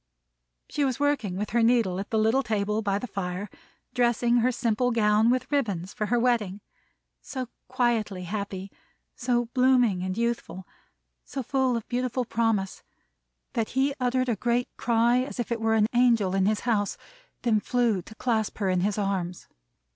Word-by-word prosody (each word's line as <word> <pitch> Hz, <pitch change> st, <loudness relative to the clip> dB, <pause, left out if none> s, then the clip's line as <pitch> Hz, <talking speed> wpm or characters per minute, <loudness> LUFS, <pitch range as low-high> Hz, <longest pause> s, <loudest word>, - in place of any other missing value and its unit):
She 295 Hz, -, -1 dB
was 265 Hz, -2 st, 0 dB
working 280 Hz, -11 st, 0 dB
with 210 Hz, +1 st, -3 dB
her 235 Hz, +1 st, +2 dB
needle 225 Hz, -6 st, +3 dB
at 200 Hz, -, -5 dB
the 220 Hz, -, 0 dB
little 220 Hz, +5 st, +3 dB
table 215 Hz, -3 st, -1 dB
by 200 Hz, -2 st, 0 dB
the 205 Hz, -, -4 dB
fire, 190 Hz, -2 st, -4 dB, 0.4 s
dressing 240 Hz, -1 st, +2 dB
her 245 Hz, +2 st, +3 dB
simple 240 Hz, 0 st, 0 dB
gown 220 Hz, -1 st, +3 dB
with 255 Hz, +3 st, 0 dB
ribbons 200 Hz, -10 st, -1 dB
for 210 Hz, -, -2 dB
her 240 Hz, +3 st, +2 dB
wedding. 225 Hz, -5 st, +1 dB, 0.6 s
So 255 Hz, -3 st, -5 dB, 0.2 s
quietly 230 Hz, -7 st, 0 dB
happy, 195 Hz, 0 st, -5 dB, 0.4 s
so 240 Hz, -1 st, 0 dB
blooming 250 Hz, -7 st, +3 dB
and 185 Hz, +2 st, -3 dB
youthful, 235 Hz, -5 st, -2 dB, 0.6 s
so 270 Hz, -, -5 dB
full 260 Hz, -1 st, +1 dB
of 230 Hz, -, -7 dB
beautiful 250 Hz, 0 st, -1 dB
promise, 225 Hz, -5 st, 0 dB, 0.7 s
that 230 Hz, -4 st, -1 dB
he 275 Hz, +1 st, +3 dB
uttered 255 Hz, 0 st, +1 dB
a 235 Hz, -, +1 dB
great 240 Hz, +3 st, -1 dB
cry 235 Hz, +1 st, +2 dB
as 255 Hz, 0 st, -4 dB
if 240 Hz, -, -3 dB
it 230 Hz, -1 st, -1 dB
were 225 Hz, 0 st, +2 dB
an 215 Hz, -1 st, +4 dB
Angel 235 Hz, -6 st, +3 dB
in 195 Hz, 0 st, +2 dB
his 215 Hz, 0 st, +1 dB
house; 210 Hz, -4 st, 0 dB, 0.5 s
then 225 Hz, -3 st, +3 dB
flew 235 Hz, -4 st, +1 dB
to 220 Hz, -, -14 dB
clasp 220 Hz, -3 st, -1 dB
her 195 Hz, -3 st, 0 dB
in 185 Hz, -, +1 dB
his 200 Hz, +3 st, 0 dB
arms. 190 Hz, -3 st, -2 dB
230 Hz, 170 wpm, -26 LUFS, 200-245 Hz, 0.7 s, an